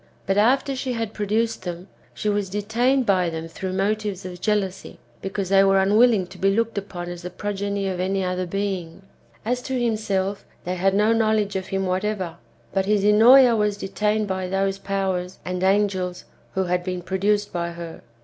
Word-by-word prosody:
But 195 - +1
after 265 +6 +3
she 255 -1 -3
liad 225 -2 -3
produced 220 +2 -1
them, 175 0 -6 0.3
she - - -4
was 205 -2 0
detained 235 +6 +1
by 185 -4 +2
them 165 0 -5
through 185 +3 -5
motives 200 0 -1
of 180 -1 -8
jealousy, 205 -3 -1 0.2
because 195 -1 -3
they 195 0 +6
were 195 0 +4
unwilling 210 +1 +4
to 185 0 -14
be 195 - +3
looked 230 +3 0
upon 190 -3 -5
as 175 0 -6
the 180 - -6
progeny 200 +1 -3
of 185 -2 -3
any 190 +1 0
other 180 0 -2
being. 190 -2 -3 0.4
As 250 +2 0
to 260 0 -2
himself, 205 -4 -1 0.2
they 180 - -2
had 190 +2 +1
no 210 +2 +4
knowledge 215 -3 +1
of 190 -1 -3
him 195 0 -1
whatever; 185 -2 -2 0.4
but 190 0 0
his 210 -1 +2
Ennoea 235 +4 +7
was 210 -2 +1
detained 210 +2 -1
by 190 -1 -2
those 195 +1 -1
powers 190 -2 -2
and 180 0 -3
angels 190 -2 +1 0.3
who 190 - +2
had 180 0 0
been 180 -1 -4
produced 205 +3 0
by 170 -1 -2
her. 170 -1 -8
195 Hz, 185 wpm, -23 LUFS, 185-210 Hz, 0.4 s, Ennoea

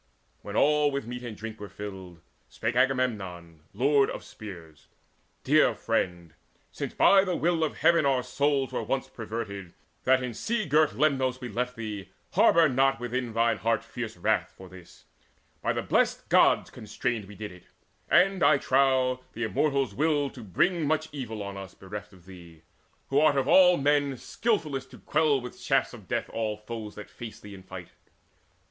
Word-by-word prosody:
When - - -7
all 150 0 +4
with 140 -3 -3
meat 125 +1 -6
and 115 -4 -7
drink 110 0 -7
Were 105 -1 -8
filled, 95 -4 -9 0.3
spake 120 - -3
Agamemnon 105 -11 -1
lord 140 +1 +3
of - - -6
spears: 85 -8 -11 0.6
"Dear - - +4
friend, 85 -3 -2 0.4
since - - -5
by 195 -1 +6
the 185 -3 -1
will 165 -1 +1
of 155 - -2
Heaven 170 -2 +4
our 135 -3 +2
souls 140 +1 0
Were - - -1
once 135 0 -2
perverted, 105 -7 -6 0.3
that 130 0 +4
in 125 -2 -4
sea 225 - -2
girt 150 +1 +3
Lemnos 130 -4 +1
We 125 -2 -6
left 125 +3 -2
thee, 105 -4 -6 0.2
harbour 165 -1 +5
not 135 -1 +2
thine 120 -1 0
heart 115 0 +1
within - - -22
Fierce 115 -5 -5
wrath 85 - 0
for 95 - -11
this: 90 -1 -15 0.6
by - - 0
the - - -2
blest - - +1
Gods - - +4
constrained 110 0 -3
We 105 +1 -12
did 105 -1 -7
it; 90 -1 -15 0.4
and, 195 0 +4
I 155 - +6
trow, 130 -1 +2
the 120 - -4
Immortals 140 +4 0
willed 145 -2 +1
To 125 - -10
bring 155 - +1
much 155 +1 0
evil 115 -7 -5
on 100 0 -6
us, 95 -2 -9
bereft 105 +2 -8
of 90 -3 -19
thee, 85 -4 -14 0.5
Who 135 - +3
art 150 -2 +4
of 135 -1 +1
all 180 +2 +6
men 145 0 +2
skilfullest 155 - -2
to - - -13
quell 150 -2 +2
With 125 -1 -9
shafts - - +1
of - - -12
death - - -2
all 110 -2 -2
foes 105 -1 -7
that 105 - -9
face 115 -2 -9
thee 105 -1 -11
in 95 - -11
fight. 95 -2 -10
125 Hz, 180 wpm, -27 LUFS, 105-140 Hz, 0.6 s, by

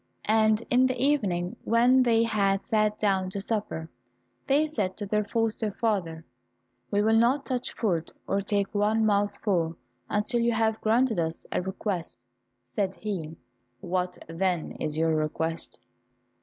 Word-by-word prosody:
And 220 0 +3
in 255 +1 +5
the 255 - -3
evening 200 -11 +1
when 245 +3 +4
they 230 -2 +4
had 200 -3 +1
sat 215 -1 +1
down 195 -3 +1
to 200 - -4
supper, 200 -6 -3 0.6
they 285 +3 +4
said 210 -12 -2
to 205 - -4
their 210 +1 0
foster 225 +1 -1
father, 185 -8 -2 0.6
"We 205 0 +1
will 220 +1 +3
not 255 +5 +3
touch 250 -2 -3
food, 175 -8 -1 0.2
or 200 +1 0
take 200 0 -1
one 215 +2 +2
mouthful, 200 -5 +1 0.3
until 235 +4 0
you 235 0 +2
have 225 -1 +1
granted 225 -1 +2
us 160 0 -2
a - - 0
request." 190 - -4 0.5
Said 195 -2 0
he, 165 -7 -5 0.4
"What, 180 +2 -2
then, 170 0 -1
is 155 0 -2
your 160 0 +2
request?" 160 +1 -2
205 Hz, 145 wpm, -27 LUFS, 180-225 Hz, 0.6 s, in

